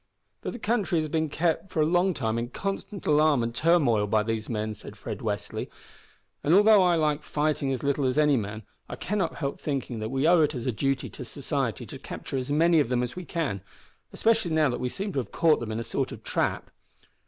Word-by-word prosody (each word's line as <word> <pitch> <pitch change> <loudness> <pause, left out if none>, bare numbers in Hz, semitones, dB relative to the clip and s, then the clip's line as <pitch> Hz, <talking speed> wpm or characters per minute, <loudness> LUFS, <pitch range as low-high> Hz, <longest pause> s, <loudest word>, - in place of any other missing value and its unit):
"But - - -4
the - - -6
country 210 -7 0
has 155 -1 -2
been 160 0 0
kept 165 +4 0
for - - -2
a 155 - +4
long 175 +2 +2
time 115 -2 -1
in 120 +1 -3
constant 195 - -5
alarm 150 -4 +4
and 115 0 -2
turmoil 125 -8 +3
by 105 +1 +2
these 110 -1 -3
men," 110 -2 -2
said 105 - -11
Fred - - -6
Westly, - - -3 0.7
"and, 155 +5 +4
although 210 0 +7
I 180 -2 +4
like 150 -2 +1
fighting 150 -2 -1
as 130 - -3
little 140 0 +1
as 130 +2 0
any 150 -2 +4
man, 110 -1 -3 0.3
I - - -4
cannot 205 0 -2
help 140 -3 -4
thinking 135 -5 -3
that 110 0 -3
we 135 +4 +1
owe 175 -1 +6
it 150 -1 +2
as 120 - -4
a 130 - +1
duty 135 +3 -1
to - - -8
society - - -3
to - - -9
capture 135 - -6
as 130 +2 -3
many 165 +2 +4
of 140 - +1
them 125 -1 +1
as 125 - -4
we 180 -1 -6
can, 145 - -2 0.5
especially 225 -4 +2
now 155 -2 +3
that 120 - -3
we 125 - -1
seem 200 +7 -4
to - - 0
have 120 - -5
caught 165 -2 +3
them 115 -2 -5
in 110 - -2
a - - -3
sort - - -2
of - - -9
trap." - - -1
145 Hz, 235 wpm, -27 LUFS, 120-170 Hz, 0.7 s, although